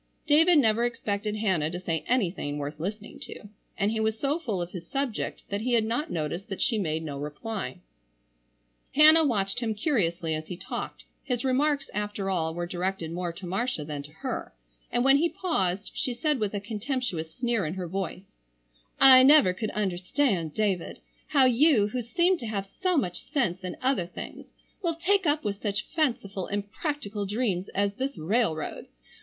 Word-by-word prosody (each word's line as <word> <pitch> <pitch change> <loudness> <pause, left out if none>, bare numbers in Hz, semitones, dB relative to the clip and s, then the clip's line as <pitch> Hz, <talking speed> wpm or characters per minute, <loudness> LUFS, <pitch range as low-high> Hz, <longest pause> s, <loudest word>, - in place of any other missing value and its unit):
David 320 +3 +6
never 230 -4 +4
expected 215 -3 -2
Hannah 190 -8 +1
to 175 +2 -5
say 165 -4 -2
anything 185 - 0
worth 145 +1 -5
listening 205 +5 -5
to, 205 - -10 0.3
and 200 +2 +1
he 220 - -1
was 220 0 +1
so 290 +4 0
full 225 - -2
of 175 0 -4
his 170 -3 -8
subject 275 -5 -2
that 200 +1 -2
he 245 +2 0
had 230 -2 +4
not 245 +8 -1
noticed 170 +6 -3
that 195 - -4
she 230 -4 +1
made 160 -4 -1
no 145 -3 -5
reply. 190 +9 -5 1.2
Hannah 310 +2 +8
watched 205 -6 +1
him 225 -3 -1
curiously 180 - 0
as 155 0 -4
he 180 - -6
talked, 185 - -6 0.2
his 250 -2 -2
remarks 280 +2 +2
after 205 -2 -2
all 160 -3 -1
were 175 0 -2
directed 175 -1 -3
more 175 0 -2
to 180 +3 -9
Marcia 195 -2 -2
than 145 -1 -4
to 145 +1 -11
her, 155 - -5 0.4
and 240 - +2
when 270 +1 +7
he 335 +4 +2
paused 195 - -1
she 250 -3 -2
said 295 +2 0
with 210 -1 -1
a - - 0
contemptuous 210 - -3
sneer 240 -4 0
in 155 +3 -3
her 185 -2 -4
voice, 190 +1 -4 0.8
"I 260 -1 +10
never 270 -8 +7
could 215 +3 -3
understand, 185 - 0
David, 200 -5 0 0.3
how 275 -3 +5
you 255 -4 +4
who 250 +3 -2
seem 345 +9 +2
to 230 - -5
have 200 -3 -2 0.2
so 365 -3 +2
much 180 -5 -2
sense 195 - 0
in 180 - -5
other 255 -10 +1
things 180 - -8 0.3
will 340 -4 0
take 375 +2 +2
up 295 +1 +2
with 205 -1 -3
such 205 0 -1
fanciful, 205 - 0
impractical 205 - -3
dreams 200 -4 -1
as 200 0 +1
this 265 +5 -3
railroad. 165 -2 -1
210 Hz, 180 wpm, -27 LUFS, 180-255 Hz, 1.2 s, I